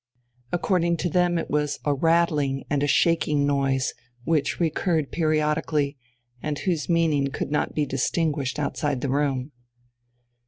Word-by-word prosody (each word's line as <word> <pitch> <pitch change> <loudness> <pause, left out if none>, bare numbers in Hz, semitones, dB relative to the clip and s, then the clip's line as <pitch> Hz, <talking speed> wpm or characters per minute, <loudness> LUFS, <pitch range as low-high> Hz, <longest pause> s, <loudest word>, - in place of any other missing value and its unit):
According 170 -1 +1
to 175 - -1
them 175 +1 +2
it 165 - -2
was 150 -1 0
a 145 - +2
rattling 150 -3 +1
and 145 -1 +1
a 145 - +1
shaking 150 -2 +2
noise, 135 -2 +1 0.3
which 150 -1 0
recurred 160 -2 0
periodically, 155 -2 0 0.5
and 150 -1 -2
whose 170 -1 -2
meaning 160 -5 +2
could 135 - -4
not 150 - -1
be 150 - +1
distinguished 145 +1 -1
outside 145 -2 -1
the 140 - -2
room. 140 -1 0
150 Hz, 140 wpm, -25 LUFS, 140-165 Hz, 0.5 s, them